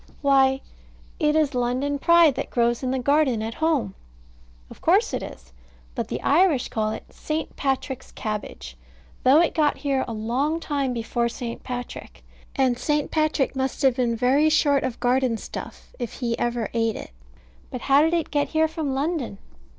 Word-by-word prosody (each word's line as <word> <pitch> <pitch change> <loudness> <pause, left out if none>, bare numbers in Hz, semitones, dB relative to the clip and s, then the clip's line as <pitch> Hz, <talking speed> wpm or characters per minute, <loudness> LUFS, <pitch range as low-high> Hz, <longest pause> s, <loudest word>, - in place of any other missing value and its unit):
Why, 270 -1 +4 0.6
it 300 -2 +2
is 305 -2 +2
London 255 +4 -1
Pride, 340 -1 +5
that 270 +2 -4
grows 235 -1 +1
in 260 - -2
the 265 - 0
garden 260 -3 +2
at 225 +1 -4
home. 285 -12 +1 0.8
Of - - -13
course - - +3
it - - -1
is: 65 0 -10 0.4
but - - -3
the - - -4
Irish 310 -4 +3
call 215 -1 -1
it 215 - -5
St. 310 +1 -4
Patrick's 265 -1 -2
cabbage; 135 - -5 0.5
though 270 +4 +6
it 345 - +1
got 300 -2 +2
here 275 -2 0
a - - -5
long 255 +9 -1
time 280 -5 -1
before 235 0 -1
St. 235 0 -6
Patrick; 245 -1 -7 0.3
and 255 -3 +1
St. 295 +1 0
Patrick 310 -4 +1
must 265 +1 -2
have 265 -3 +4
been 245 -2 0
very 265 +6 +3
short 285 -3 +3
of 245 - -3
garden 245 -1 +1
stuff - - -9
if 240 -2 -4
he 235 -3 -2
ever 240 -2 -1
ate 225 -1 0
it. - - -8 0.6
But 250 - -6
how 280 +1 +4
did 325 +2 +2
it 330 -3 -2
get 290 -1 +1
here 315 0 +2
from 310 -4 -3
London? 280 - -2
265 Hz, 175 wpm, -24 LUFS, 240-295 Hz, 0.8 s, though